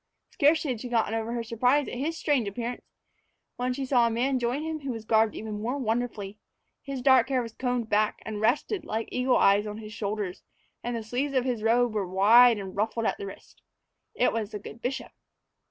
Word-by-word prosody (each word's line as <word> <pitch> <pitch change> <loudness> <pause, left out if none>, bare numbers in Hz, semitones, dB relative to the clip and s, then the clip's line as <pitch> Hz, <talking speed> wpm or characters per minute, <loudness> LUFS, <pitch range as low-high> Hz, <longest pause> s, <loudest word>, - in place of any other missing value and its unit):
Scarcely 300 0 +3
had 230 -3 -4
she 250 - -6
gotten 225 -2 +1
over 225 0 -2
her 235 -1 -2
surprise 250 +5 +2
at - - -6
his 300 +6 -2
strange 280 -10 +1
appearance, 235 +4 -4 0.8
when 250 +1 -1
she 270 +2 -3
saw 245 -3 +3
a - - +1
man 255 +3 0
join 245 +5 -1
him 320 -1 -3
who 280 -2 -6
was 225 -3 -5
garbed 220 -1 +3
even 215 -1 -5
more 245 +5 -2
wonderfully. 220 -4 -3 0.4
His 275 -3 -6
dark 260 -1 +5
hair 255 -2 +1
was 230 -1 -8
combed 245 -2 -2
back 210 0 +1
and 215 -1 -5
rested, 295 - +1
like 225 -6 -3
Eagle 250 0 +2
Eye's, 200 +2 +4
on 210 0 -5
his 215 -1 -9
shoulders, 205 -3 -3 0.4
and 240 0 -2
the 230 - -4
sleeves 260 +6 -2
of 255 -1 +2
his 245 -4 -1
robe 235 +1 +2
were 205 -3 -1
wide 220 +6 +6
and 190 -2 -7
ruffled 220 +2 -1
at - - 0
the 200 - -5
wrist. 195 - -13 0.5
It 250 - +2
was 220 -3 -2
the 215 - -5
good 215 +3 -11
bishop. 260 +2 -4
235 Hz, 215 wpm, -27 LUFS, 215-255 Hz, 0.8 s, wide